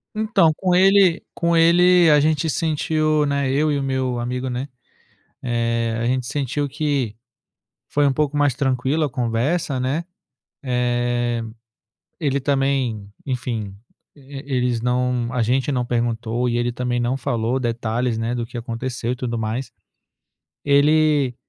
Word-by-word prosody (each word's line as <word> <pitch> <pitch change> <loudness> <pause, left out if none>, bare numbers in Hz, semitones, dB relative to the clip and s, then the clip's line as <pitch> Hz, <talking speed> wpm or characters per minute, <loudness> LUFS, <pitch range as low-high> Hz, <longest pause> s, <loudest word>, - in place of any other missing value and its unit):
Então, 215 -7 +3
com 185 +1 0
ele 190 -1 +5
com 170 0 0
ele, 175 +1 +5
a 150 -1 +6
gente 155 +2 +1
sentiu, 155 0 +1
né, 140 -2 0
eu 150 +3 +2
e 145 - 0
o 140 - -2
meu 130 -2 -1
amigo, 125 +2 -3
né, 125 +2 -3 0.7
eh, 115 -1 -1
a 115 - -1
gente 125 0 0
sentiu 145 +1 -2
que 140 -6 -1 0.7
foi 145 0 +2
um 135 - +3
pouco 145 +1 -1
mais 145 -3 +2
tranquilo 135 +3 0
a 145 - -2
conversa, 125 +5 -1
né. 135 +6 -1 0.6
Eh, 120 -1 0 0.8
ele 140 -3 0
também, 135 -7 -1
enfim, 115 -6 -3 0.4
eles 135 -4 -3
não 125 -1 0
a 125 -2 +1
gente 130 +4 0
não 125 -2 -1
perguntou 120 0 -1
e 120 - 0
ele 120 0 0
também 120 0 -2
não 120 +2 0
falou 120 -1 -1
detalhes, 120 0 -1
né, 115 +1 -2
do 120 -1 -2
que 120 - -8
aconteceu 120 +1 -4
e - - -1
tudo 120 -2 -3
mais. 110 +4 -3 0.9
Ele 145 -2 +3
130 Hz, 145 wpm, -21 LUFS, 120-145 Hz, 0.9 s, a